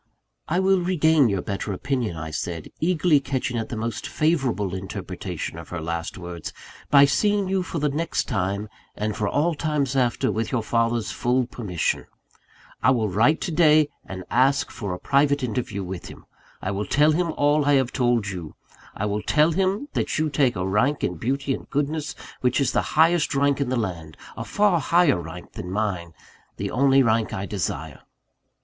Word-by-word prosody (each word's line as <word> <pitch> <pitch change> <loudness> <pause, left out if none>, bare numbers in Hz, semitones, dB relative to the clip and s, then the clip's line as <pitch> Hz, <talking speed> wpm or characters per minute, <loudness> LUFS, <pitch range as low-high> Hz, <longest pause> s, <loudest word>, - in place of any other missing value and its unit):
"I 175 +3 +1
will 190 -1 +3
regain 160 -6 +3
your 100 -3 -1
better 100 0 -3
opinion," 120 -4 -2
I 80 0 -5
said, 85 +1 -4
eagerly 165 -2 +3
catching 130 -2 -2
at 110 - -4
the - - -4
most 115 +1 -3
favourable 130 - 0
interpretation 95 0 -5
of - - -11
her 85 - -4
last 85 +1 -4
words, 85 -3 -7 0.4
"by 140 -1 +8
seeing 205 +6 +1
you 190 0 +1
for 180 - -5
the 150 -1 +1
next 155 +4 -1
time, 100 -2 -1 0.3
and 105 0 -2
for 105 -2 -1
all 165 +4 +1
times 145 -4 -1
after, 125 -4 +1
with 110 0 -2
your 120 -4 0
father's 115 0 0
full 125 +1 +1
permission. 105 -8 -2 0.7
I - - +4
will 115 -5 +2
write 115 - +3
to - - -2
day, 155 -2 +5
and 95 -1 -7
ask 135 +3 +3
for 100 -4 -5
a 90 - -3
private 140 0 +2
interview 105 -4 -2
with 90 -1 -6
him. - - -12 0.4
I 95 - -1
will 100 0 -3
tell 150 +7 +4
him 170 +1 +1
all 145 0 +2
I 145 - +4
have 130 -3 +2
told 120 -4 +2
you: 90 -5 -6 0.4
I 105 - -2
will 105 0 -1
tell 155 +7 +3
him 195 - 0
that - - -1
you 155 -1 0
take 135 -3 +2
a 90 +1 -2
rank 125 +9 +1
in 90 - -1
beauty 135 - -1
and - - -7
goodness, 150 +1 -2 0.2
which 125 +1 +1
is 135 -3 +2
the - - +2 0.2
highest 165 -1 +4
rank 140 0 +2
in 135 - 0
the 130 - 0
land 85 -8 -4 0.2
a - - -5
far 205 -4 +2
higher 165 - +3
rank 85 +2 -9
than 90 - -7
mine 90 -5 -2 0.4
the - - -3
only 135 +1 +4
rank 110 -1 +1
I 95 - -3
desire." 80 -7 -4
125 Hz, 190 wpm, -24 LUFS, 100-150 Hz, 0.7 s, by